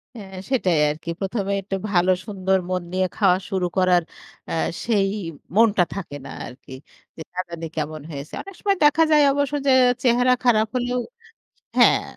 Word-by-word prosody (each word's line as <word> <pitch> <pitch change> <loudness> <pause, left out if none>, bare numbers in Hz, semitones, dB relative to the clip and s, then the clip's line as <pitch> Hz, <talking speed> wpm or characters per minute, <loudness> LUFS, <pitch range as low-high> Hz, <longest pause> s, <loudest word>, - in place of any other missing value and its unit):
হ্যাঁ 190 -3 -10 0.2
সেটাই 180 - +2
আরকি। 155 +3 -6
১ম 200 +1 -2
এ - - +1
একটু 195 0 -4 0.2
ভালো 180 0 +3
সুন্দর 190 -2 0
মন 185 -1 -1
নিয়ে 185 0 +1
খাওয়া 190 -4 +4
শুরু 190 -3 -1
করার 180 -1 +4 0.5
আ - - -5 0.3
সেই 205 -4 +2 0.5
মনটা 215 -4 +5
থাকে 170 -7 -6
না - - -8 0.2
আরকি। 130 +1 -13 0.5
যে - - -8
না 185 - -5
জানি 165 -1 -6
কেমন 155 0 -4
হয়েছে। 140 +1 -8
অনেক 390 - -11
সময় 395 -2 +1
দেখা 295 +2 +5
যায় 300 -1 +6
অবশ্য 285 0 -1
যে - - +5 0.3
চেহারা 250 +1 +4
খারাপ 220 -3 +3
হলেও 245 0 -1 0.8
হ্যাঁ, - - +5
195 Hz, 170 wpm, -22 LUFS, 180-240 Hz, 0.8 s, যায়